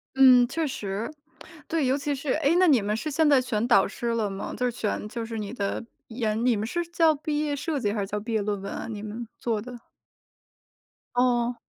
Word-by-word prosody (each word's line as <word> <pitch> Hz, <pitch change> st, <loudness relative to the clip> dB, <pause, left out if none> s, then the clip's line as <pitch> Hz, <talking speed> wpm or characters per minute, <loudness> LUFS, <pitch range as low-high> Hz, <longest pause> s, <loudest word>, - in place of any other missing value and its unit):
嗯， 255 Hz, -2 st, +7 dB
确 315 Hz, +4 st, -1 dB
实。 210 Hz, 0 st, -4 dB, 0.6 s
对， 315 Hz, -4 st, 0 dB
尤 265 Hz, +2 st, +2 dB
其 290 Hz, 0 st, -2 dB
是 275 Hz, 0 st, -1 dB
诶， 315 Hz, +1 st, +2 dB
那 365 Hz, 0 st, +5 dB
你 260 Hz, -8 st, +5 dB
们 210 Hz, +1 st, -1 dB
是 310 Hz, -, -3 dB
现 310 Hz, +1 st, +2 dB
在 280 Hz, -2 st, +6 dB
选 235 Hz, -3 st, -1 dB
导 195 Hz, -, +5 dB
师 235 Hz, +3 st, -5 dB
了 230 Hz, -3 st, 0 dB
吗？ 195 Hz, 0 st, -5 dB
就 250 Hz, -, 0 dB
是 -, -, -3 dB
选 210 Hz, -2 st, -2 dB
就 230 Hz, +1 st, -5 dB
是 225 Hz, 0 st, -5 dB
你 210 Hz, +1 st, -4 dB
的 200 Hz, 0 st, -3 dB, 0.2 s
研 225 Hz, 0 st, -1 dB
你 245 Hz, -3 st, +4 dB
们 215 Hz, +2 st, -2 dB
是 345 Hz, +7 st, -1 dB
叫 330 Hz, -2 st, +3 dB
毕 295 Hz, +1 st, -2 dB
业 295 Hz, -1 st, 0 dB
设 295 Hz, 0 st, -2 dB
计 205 Hz, -3 st, 0 dB
还 210 Hz, -, -1 dB
是 195 Hz, -, -3 dB
叫 210 Hz, +1 st, -3 dB
毕 225 Hz, +2 st, -5 dB
业 215 Hz, -, +2 dB
论 205 Hz, -1 st, -2 dB
文 195 Hz, -, -5 dB
啊， -, -, -5 dB
你 210 Hz, -2 st, -5 dB
们 220 Hz, +2 st, -6 dB
做 225 Hz, -3 st, -1 dB
的。 245 Hz, +1 st, -9 dB, 1.4 s
哦。 245 Hz, -1 st, +2 dB
240 Hz, 245 characters per minute, -26 LUFS, 215-280 Hz, 1.4 s, 嗯